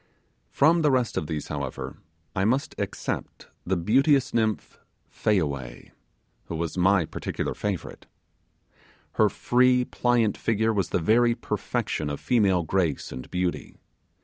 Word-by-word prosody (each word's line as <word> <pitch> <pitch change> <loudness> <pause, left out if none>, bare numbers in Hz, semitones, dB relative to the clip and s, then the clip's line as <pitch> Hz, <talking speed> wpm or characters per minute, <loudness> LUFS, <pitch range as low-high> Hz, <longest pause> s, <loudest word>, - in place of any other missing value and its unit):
From 165 +4 +4
the 150 - +3
rest 130 -3 +1
of 75 - -2
these, 75 -2 -4
however, 70 -3 -5 0.4
I 95 - +1
must 130 +7 +1
except - - -4 0.2
the 95 0 +1
beauteous 135 - +3
nymph 110 -2 -1 0.3
Fayaway, 70 - -2 0.5
who 85 - -5
was 80 -1 -3
my 95 -1 +3
peculiar - - -4
favourite. 100 -4 -5 1.0
Her - - +3
free 125 0 +3
pliant 120 -4 +1
figure 110 0 +1
was 100 -4 0
the - - +1
very 115 +7 +3
perfection 75 -8 -2
of 70 - -4
female 100 -8 +2
grace 80 -3 -1
and 65 - -8
beauty. 90 -1 -3
100 Hz, 130 wpm, -26 LUFS, 85-120 Hz, 1.0 s, From